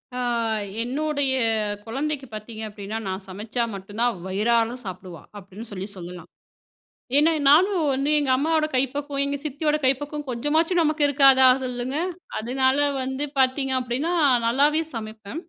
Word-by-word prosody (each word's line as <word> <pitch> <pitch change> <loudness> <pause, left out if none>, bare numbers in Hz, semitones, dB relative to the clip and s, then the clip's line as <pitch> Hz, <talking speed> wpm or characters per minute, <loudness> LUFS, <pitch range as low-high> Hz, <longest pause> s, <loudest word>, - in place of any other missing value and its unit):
ஆ, - - -3 0.6
என்னுடைய 285 +2 -1 0.5
குழந்தைக்கு 275 +4 -3
பாத்தீங்க 215 +1 -7
அப்படின்னா 205 +1 -6
நான் 190 +1 -4
சமைச்சா 215 +5 -3
மட்டும் 200 +3 -9
தான் 240 -6 +1
வயிறார 225 +4 +1
சாப்புடுவா, 180 -4 -8 0.2
அப்படின்னு 200 +3 -10
சொல்லி 195 0 -5
சொல்லலாம். 175 -1 -9 0.9
ஏன்னா 310 +3 +5 0.2
நானும் 340 +2 +4
வந்து 275 +2 -1
எங்க 285 -2 -1
அம்மாவோட 310 +2 +1
கைப்பக்குவம், 280 +2 -1
எங்க 280 0 -2
சித்தியோட 300 +1 0
கைப்பக்குவம் 290 +2 -1
கொஞ்சமாச்சும் 310 +8 +1
நமக்கு 305 -1 +1
இருக்காதா 270 -2 +6 0.2
சொல்லுங்க. 250 +1 -3 0.4
அதனால 260 +4 +1 0.2
வந்து 265 +2 -3
பாத்தீங்க 265 +1 +2
அப்படின்னா 255 +7 -2 0.3
நல்லாவே 285 +6 +3
சமைப்பேன். 220 +5 -7
260 Hz, 130 wpm, -24 LUFS, 220-290 Hz, 0.9 s, இருக்காதா